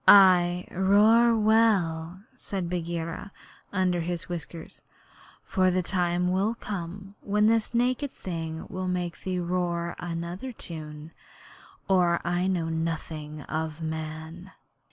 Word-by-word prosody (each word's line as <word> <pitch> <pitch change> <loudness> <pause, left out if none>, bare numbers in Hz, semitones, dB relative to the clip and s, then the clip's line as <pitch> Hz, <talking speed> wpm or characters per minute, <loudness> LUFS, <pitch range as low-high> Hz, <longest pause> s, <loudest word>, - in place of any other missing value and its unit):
'Ay, 180 -2 +7
roar 215 +5 +5
well,' 195 -6 +2
said 190 -3 -4
Bagheera, 170 +2 -4 0.4
under 185 -2 +1
his 175 0 -3
whiskers; 170 -1 -7 0.6
'for 185 -1 +2
the 185 0 +1
time 180 +4 +1
comes 195 -2 -6
when 210 +1 +2
this 225 +1 +2
naked 255 +3 +1
thing 165 -3 -5
will 185 0 -4
make 180 -2 -2
thee 185 -1 -2
roar 175 -1 -1
to - - -8
another 175 +8 -4
tune, 155 -5 -8 0.8
or 175 -3 +3
I 175 +1 +1
know 175 -4 0
nothing 160 -2 -3
of 160 0 -3
man.' 160 +3 -6
180 Hz, 115 wpm, -27 LUFS, 165-195 Hz, 0.8 s, Ay